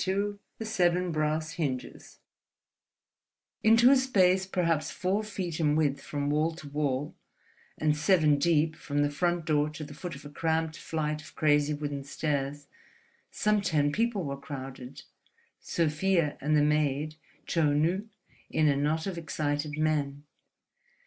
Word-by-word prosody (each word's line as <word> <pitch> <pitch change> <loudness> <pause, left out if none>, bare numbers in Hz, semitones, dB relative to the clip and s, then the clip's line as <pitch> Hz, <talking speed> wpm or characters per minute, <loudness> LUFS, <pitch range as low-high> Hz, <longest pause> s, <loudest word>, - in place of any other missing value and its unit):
XXII 200 +2 -1 0.2
THE 225 - -5
SEVEN 180 -4 +1
BRASS 155 0 -1
HINGES 135 -6 -4 1.5
Into 230 +3 +6
a - - +7
space 190 -8 +3
perhaps 170 -5 0
four 190 +3 -1
feet 185 -6 -4
in 150 -2 +2
width 145 -3 +1
from 145 0 -2
wall 155 +2 +1
to 155 -3 -10
wall 145 -1 -1 0.6
and 155 -1 +2
seven 150 -2 +3
deep 155 0 +2
from 145 -1 -1
the 145 - 0
front 175 +3 0
door 150 -1 +2
to 155 0 -7
the 145 0 -9
foot 165 +1 -6
of 140 - -12
a - - -7
cramped 160 +1 -1
flight 150 -2 -3
of 155 - -14
crazy 150 -1 +3
wooden 145 -1 -4
stairs, 140 0 -2 0.6
some 210 -1 +1
ten 150 -6 +1
people 225 0 0
were 140 -2 -5
crowded, 135 -3 -8 0.6
Sofia 165 0 +1
and 150 +2 +2
the 145 - +4
maid 150 0 +1 0.3
Chou 150 -4 +2
Nu 180 +8 +1 0.4
in 155 -1 +2
a 145 - +3
knot 150 +3 0
of 185 -3 -3
excited 150 -2 -2
men. 145 -2 0
155 Hz, 150 wpm, -29 LUFS, 145-175 Hz, 1.5 s, a